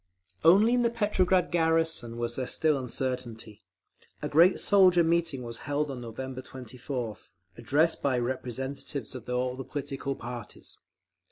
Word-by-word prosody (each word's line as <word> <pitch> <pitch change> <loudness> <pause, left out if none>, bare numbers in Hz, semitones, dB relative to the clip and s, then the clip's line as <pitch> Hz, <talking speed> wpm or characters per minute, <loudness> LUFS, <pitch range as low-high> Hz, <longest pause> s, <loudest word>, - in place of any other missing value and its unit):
Only 200 +8 +6
in 250 - +3
the 235 - +3
Petrograd 190 -5 +1
garrison 160 -8 +1
was 120 0 -2
there 130 -1 -3
still 155 -2 +3
uncertainty. 125 -4 -4 0.6
A - - 0
great 170 +5 +5
soldier 185 -3 +5
meeting 165 -5 0
was 115 -1 -5
held 145 0 0
on 125 -2 -6
November 130 +3 -6
24th, 125 -4 -7 0.2
addressed 155 - +1
by 135 -3 +1
representatives 130 +1 -4
of 125 -2 -9
all 125 0 -1
the 135 - -6
political 135 0 -4
parties. 120 -2 -8
135 Hz, 140 wpm, -28 LUFS, 125-165 Hz, 0.6 s, Only